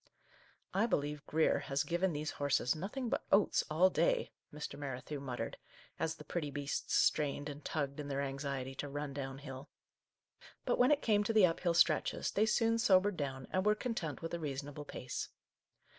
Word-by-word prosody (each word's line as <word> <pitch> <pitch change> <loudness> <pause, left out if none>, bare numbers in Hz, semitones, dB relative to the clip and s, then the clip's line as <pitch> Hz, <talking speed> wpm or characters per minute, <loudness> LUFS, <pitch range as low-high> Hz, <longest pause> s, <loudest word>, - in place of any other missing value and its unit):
" - - -27 0.3
I 210 +4 +3
believe 145 -7 -1
Grier 160 +1 +3
has 135 0 -1
given 175 +2 +1
these 150 0 -3
horses 145 -2 +1
nothing 215 - -4
but - - -1
oats 200 0 +4
all 175 +5 +4
day," - - +2 0.2
Mr. 150 -1 -6
Merrithew 140 +1 -5
muttered, 125 -3 -4 0.4
as 160 0 0
the - - -11
pretty 150 0 -3
beasts 140 0 -2
strained 145 -1 +2
and 145 0 -7
tugged 140 -2 -2
in 145 - -4
their 140 0 -1
anxiety 135 -1 -3
to 145 +2 -5
run 145 0 -4
down 135 -1 -4
hill; 135 0 -8 1.0
but - - +1
when 250 +1 +6
it 295 -1 +3
came 210 -2 +3
to 225 - 0
the 215 -4 +7
up 165 -2 0
hill 170 -2 +1
stretches, - - +3
they 215 +2 +2
soon 230 +1 +3
sobered 200 -2 +4
down, 135 -4 -4
and 185 - +1
were 210 +1 +4
content 175 - -3
with 165 - -4
a 170 - -1
reasonable 145 0 -5
pace. 125 -3 -5
150 Hz, 190 wpm, -35 LUFS, 140-190 Hz, 1.0 s, the